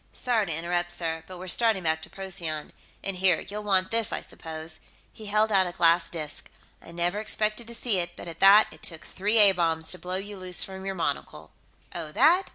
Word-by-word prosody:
"Sorry 230 -5 +1
to - - -3
interrupt, 175 +2 -1
sir, 165 -2 -2
but 185 - -9
we're 185 +1 -8
starting 220 0 +2
back 160 -1 0
to - - -10
Procyon. 175 -6 -5 0.3
And 195 -1 -2
here, 185 0 +3
you'll 210 +1 -5
want 190 -2 +2
this, 230 -1 +1
I - - -2
suppose." 160 0 -8 0.3
He 215 - -9
held 215 +1 +2
out 190 -2 +4
a - - -4
glass 170 0 +3
disc. 155 -3 -6 0.3
"I - - -13
never 175 +4 -1
expected 215 +1 -1
to 235 - -5
see 230 -5 +1
it, 175 0 -3
but - - -10
at 165 -1 -8
that 200 +2 +7
it - - -14
took 165 -3 -3
three 210 +4 0
A 205 -2 +8
bombs 165 -3 +1
to 180 - -1
blow 180 +2 -4
you 205 +1 -7
loose 185 -1 -1
from 190 0 -8
your 195 - -3
monocle." 145 -6 -4 0.4
"Oh, 155 - -6
that?" 345 - +4
185 Hz, 220 wpm, -27 LUFS, 170-210 Hz, 0.4 s, A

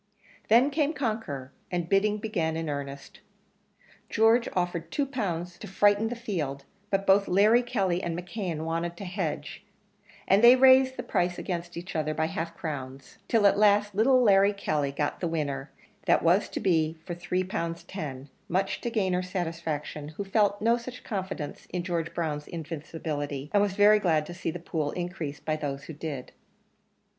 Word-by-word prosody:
Then 245 +6 +5
came 300 +1 +1
Conqueror, 215 - -3 0.2
and 175 -2 -2
bidding 205 +3 +2
began 165 -7 -1
in 165 -1 -3
earnest. 140 -1 -6 0.9
George 225 +2 +4
offered 175 -2 -2
two 285 - 0
pound 200 -11 -2
to - - -8
frighten 205 +3 +3
the 245 - -3
field; 160 - -4 0.2
but 195 0 0
both 195 +1 +4
Larry 210 +6 +5
Kelly 195 -8 0
and 170 -2 -3
McKeon 175 -3 -4
wanted 165 +1 -2
to 200 - -7
hedge, 180 -4 -4 0.6
and 200 +4 +4
they 240 +2 +10
raised 260 0 +6
the - - -3
price 175 0 0
against 175 -1 -4
each 175 +2 -7
other 155 -1 -1
by 160 - +1
half 165 +1 -4
crowns, 135 -4 -6
till 225 -3 +3
at 200 - +5
last 205 0 +4
little 250 +5 +4
Larry 200 -1 +5
Kelly 150 -8 -1
got 145 +1 -2
the 175 - -1
winner, 145 -4 -2 0.4
that - - +4
was 175 +5 +3
to - - -4
be, 160 -3 +1
for 175 - -4
three 180 +2 -1
pound 170 -3 -4
ten, 140 -8 -6 0.2
much 190 +3 0
to 235 - -2
Gayner's 185 -5 0
satisfaction, 165 -5 -3
who - - -2
felt 205 0 +2
no 230 +1 +4
such 250 +1 -9
confidence 190 - -5
in 180 -1 -3
George 170 -2 -2
Brown's 150 -3 -2
invincibility, 150 -3 -5
and 205 - +5
was 205 -2 +1
very 210 +1 +6
glad 160 -6 +2
to 175 - -8
see 175 -1 -4
the 170 - -4
pool 160 -3 -2
increased 175 -5 -5
by 155 - +1
those 145 -2 -4
who 160 - -8
did. 145 -4 -6
175 Hz, 175 wpm, -28 LUFS, 160-205 Hz, 0.9 s, they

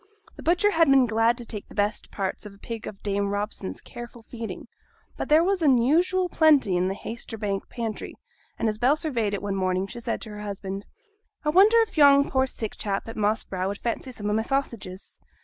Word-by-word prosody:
The - - -10
butcher 360 +5 +3
had 330 -4 +4
been 270 -2 +6
glad 225 +1 +2
to 240 - -7
take 210 -3 -6
the - - -13
best 205 0 0
parts 195 +1 -3
of 200 - -13
a - - -19
pig 225 +2 -7
of 195 - -9
Dame 200 -1 0
Robson's 205 -1 -3
careful 240 -1 -10
feeding; 230 -1 -7 0.5
but - - -5
there 310 +2 +6
was 385 0 +1
unusual 315 +7 +3
plenty 300 - +4
in 180 +1 +1
the 190 - -2
Haytersbank 210 -3 -5
pantry; 225 -3 -5 0.4
and 230 - 0
as 215 0 -2
Bell 255 +5 +4
surveyed 240 -10 -1
it 200 - -6
one 200 -1 -2
morning, 185 0 0
she 235 +5 -8
said 230 0 -2
to 220 - -6
her 210 0 -7
husband 200 -1 -5 0.6
'I - - +2
wonder 405 +8 +6
if 440 -8 -2
yon 280 -1 +6
poor 265 0 +2
sick 220 -4 -5
chap 200 0 -2
at 225 - -7
Moss 215 +1 +1
Brow 185 0 -3
would 200 +1 -3
fancy 240 +3 -3
some 210 -4 -6
o' 210 - +1
my 220 - +2
sausages. 225 -7 -4
225 Hz, 215 wpm, -25 LUFS, 205-275 Hz, 0.6 s, been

